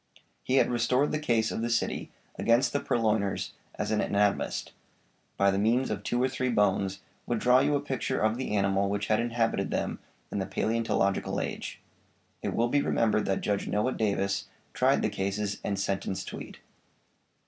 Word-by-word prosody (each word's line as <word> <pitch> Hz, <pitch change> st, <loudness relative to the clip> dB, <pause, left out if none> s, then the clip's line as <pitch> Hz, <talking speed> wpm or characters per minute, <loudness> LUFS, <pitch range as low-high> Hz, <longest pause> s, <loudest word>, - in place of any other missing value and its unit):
He 130 Hz, -, 0 dB
had 135 Hz, -, +4 dB
restored 125 Hz, +4 st, +2 dB
the 155 Hz, -, 0 dB
case 120 Hz, -7 st, +1 dB
of -, -, -3 dB
the 120 Hz, -, -1 dB
city 115 Hz, -, -1 dB, 0.3 s
against 120 Hz, +3 st, +2 dB
the 145 Hz, -, +2 dB
purloiners 110 Hz, -6 st, 0 dB, 0.2 s
as -, -, -2 dB
an 110 Hz, -, +2 dB
anatomist, 100 Hz, 0 st, 0 dB, 0.7 s
by 100 Hz, 0 st, +4 dB
the 95 Hz, -, 0 dB
means 120 Hz, +5 st, +2 dB
of -, -, -2 dB
two 120 Hz, -, -1 dB
or -, -, +4 dB
three 130 Hz, 0 st, -1 dB
bones, 100 Hz, -3 st, +1 dB, 0.3 s
would 120 Hz, -, 0 dB
draw 125 Hz, +3 st, +5 dB
you 145 Hz, +2 st, +2 dB
a -, -, +2 dB
picture 135 Hz, -3 st, -2 dB
of 110 Hz, +1 st, +2 dB
the 125 Hz, -4 st, -2 dB
animal 100 Hz, 0 st, +2 dB
which 100 Hz, 0 st, -2 dB
had 110 Hz, -, +3 dB
inhabited 115 Hz, -4 st, 0 dB
them -, -, -2 dB, 0.3 s
in -, -, -2 dB
the 95 Hz, -, -2 dB
palæontological 110 Hz, -1 st, 0 dB
age.' -, -, -6 dB, 0.6 s
It -, -, -2 dB
will 120 Hz, +1 st, +2 dB
be 145 Hz, +3 st, +3 dB
remembered 110 Hz, -5 st, +1 dB
that 95 Hz, -, 0 dB
Judge 100 Hz, -1 st, -1 dB
Noah 105 Hz, +5 st, +1 dB
Davis 100 Hz, -2 st, 0 dB, 0.3 s
tried -, -, +3 dB
the -, -, +2 dB
cases 100 Hz, +1 st, -2 dB
and 100 Hz, -1 st, -1 dB
sentenced 95 Hz, -1 st, -2 dB
Tweed. -, -, -8 dB
110 Hz, 180 wpm, -29 LUFS, 100-120 Hz, 0.7 s, draw